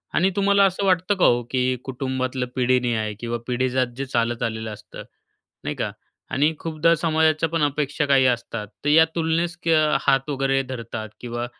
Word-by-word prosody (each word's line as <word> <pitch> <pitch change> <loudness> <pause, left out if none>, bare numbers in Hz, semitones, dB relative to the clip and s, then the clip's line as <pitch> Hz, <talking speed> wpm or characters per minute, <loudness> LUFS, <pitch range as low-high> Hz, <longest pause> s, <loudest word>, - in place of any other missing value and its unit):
आणि 185 - +3
तुम्हाला 200 0 +4
असं 195 +1 0
वाटतं 185 +1 +2
का - - +5
हो, 120 0 +4
की 130 -1 +1 0.2
कुटुंबातलं 130 -1 -3
पिढीन्याय 120 -4 +1
किंवा 120 +1 -3
पिढीजात 130 0 0
जे 135 - -3
चालत 120 -2 -1
आलेलं 110 0 -5
असतं 105 - -11 0.6
नाही - - -3
का. - - -2 0.4
आणि 150 +4 +2
खूपदा 165 +1 +1
समाजाच्या 160 -1 +2
पण 165 0 -1
अपेक्षा 145 +1 0
काही 135 -2 +4
असतात 115 -2 -5 0.2
तर - - 0
या 160 +2 +7
तुलनेस 165 +1 0
क - - +1 0.3
हात 135 0 +1
वगैरे 135 -1 +1
धरतात, 115 -4 -6
किंवा 120 0 -4
135 Hz, 165 wpm, -23 LUFS, 120-160 Hz, 0.6 s, या